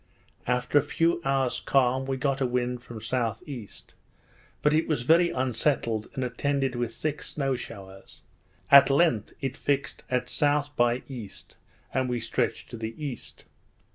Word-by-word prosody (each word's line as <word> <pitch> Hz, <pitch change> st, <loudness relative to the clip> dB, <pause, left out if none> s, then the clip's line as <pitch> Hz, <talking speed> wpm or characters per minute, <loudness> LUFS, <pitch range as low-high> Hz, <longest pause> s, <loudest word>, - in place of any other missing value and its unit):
After 125 Hz, +3 st, +3 dB
a -, -, +2 dB
few 165 Hz, +4 st, +1 dB
hours 135 Hz, -2 st, +1 dB
calm, 130 Hz, 0 st, +2 dB
we 135 Hz, -1 st, -1 dB
got 135 Hz, 0 st, 0 dB
a 130 Hz, -, +3 dB
wind 125 Hz, 0 st, -1 dB
from 120 Hz, -2 st, -9 dB
S.E.; 115 Hz, 0 st, -3 dB, 1.0 s
but 150 Hz, -, +4 dB
it 160 Hz, +1 st, +2 dB
was 150 Hz, -6 st, 0 dB
very 170 Hz, +6 st, +5 dB
unsettled, 125 Hz, -3 st, 0 dB
and 130 Hz, -, -1 dB
attended 135 Hz, +2 st, 0 dB
with 120 Hz, -2 st, -3 dB
thick 155 Hz, -1 st, -3 dB
snow 135 Hz, -3 st, -2 dB
showers; 95 Hz, -5 st, -10 dB, 0.5 s
at 140 Hz, 0 st, +9 dB
length 135 Hz, -, +2 dB
it 135 Hz, -2 st, -2 dB
fixed 140 Hz, -1 st, -1 dB
at 125 Hz, -1 st, +1 dB, 0.2 s
S. 145 Hz, 0 st, +3 dB
by 120 Hz, -3 st, +1 dB
E., 120 Hz, -7 st, -7 dB, 0.6 s
and 130 Hz, -1 st, 0 dB
we 120 Hz, -1 st, -1 dB
stretched 115 Hz, -, -2 dB
to -, -, -6 dB
the 110 Hz, 0 st, -5 dB
east. 145 Hz, -5 st, -6 dB
130 Hz, 155 wpm, -27 LUFS, 120-140 Hz, 1.0 s, at